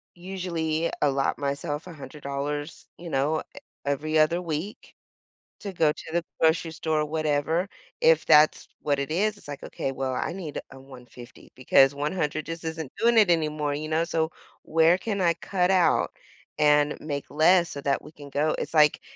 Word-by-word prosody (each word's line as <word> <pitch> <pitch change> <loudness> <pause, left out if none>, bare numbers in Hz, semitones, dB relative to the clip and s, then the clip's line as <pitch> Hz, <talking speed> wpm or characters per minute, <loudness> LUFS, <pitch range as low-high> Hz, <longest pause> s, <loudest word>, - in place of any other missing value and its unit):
usually 170 -3 -2
allot 135 -2 +1
myself 145 +2 -3
$100, 145 -1 -6
you 170 -1 -8
know, 150 +3 0
e - - -10 0.3
every 155 +3 0
other 165 +3 +3
week 170 +4 -5 0.7
to 200 -2 -6
go 160 -3 +3
to 150 - -9
the 170 0 +1 0.2
grocery 160 +1 +2
store 160 -1 -1
or - - 0
whatever," 155 +3 0 0.3
if 485 0 +4
that's 150 +1 +5
what 145 -2 0
it 140 - -3
is, 205 +5 0
it's - - -17
like, 145 -1 -7
"Okay, 135 - -4
well, 130 -1 -3
I 135 +4 -2
need, 170 -6 -5
uh, 135 - -12
$150 125 -2 -14
because 135 +2 +4
$100 150 +1 -2
just 165 0 -6
isn't 160 -3 -5
doing 235 0 +4
it 205 -5 +6
anymore," 150 -3 0
you 150 +2 -4
know, 160 +1 +1
"so 165 -1 -1 0.3
where 165 +2 +3
can 205 -1 -3
I 170 -2 +3
cut 180 +2 0
out 180 -3 +3 0.5
and 150 0 +3
make 145 -2 -5
less 170 +3 +4
so 140 - -6
that 140 -1 0
we 150 - -12
can 145 -2 -12
go" 150 +3 +1
it's - - -5
like 150 -1 +5
155 Hz, 175 wpm, -26 LUFS, 145-170 Hz, 0.7 s, it